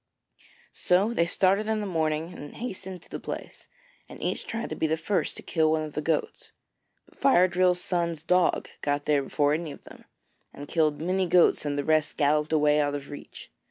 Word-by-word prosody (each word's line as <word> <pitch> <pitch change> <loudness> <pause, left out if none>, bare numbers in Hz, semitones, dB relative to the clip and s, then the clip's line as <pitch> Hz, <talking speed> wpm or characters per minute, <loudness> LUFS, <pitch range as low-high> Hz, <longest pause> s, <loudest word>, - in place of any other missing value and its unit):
So 195 +6 +2
they 170 -6 +2
started 195 +4 +2
in 220 0 0
the 210 - -3
morning 160 -2 -1
and 145 - -10
hastened 190 -6 -6
to - - -18
the - - -5
place, - - -8 0.4
and - - -11
each - - -3
tried 225 0 -4
to - - -2
be 160 - 0
the 160 +1 0
first 190 +5 -1
to - - -9
kill 160 -2 +1
one 155 0 +1
of 155 -1 -7
the 150 - -2
goats. 155 0 -2 0.5
But - - -25
Fire 185 -10 +5
drill's 180 0 +2
son's 170 -3 -1
dog 180 +1 +2
got 145 0 -1
there 145 -2 +3
before 145 +1 +1
any 160 0 -3
of - - -12
them, - - -15 0.5
and 145 - -8
killed 155 -2 +1
many 185 +3 0
goats 175 -2 +4
and 145 -1 -1
the 145 - 0
rest 155 0 +1
galloped 150 +1 +2
away 150 -1 +3
out 145 -1 +1
of 140 0 -7
reach. 145 - -11
160 Hz, 205 wpm, -27 LUFS, 150-180 Hz, 0.5 s, Fire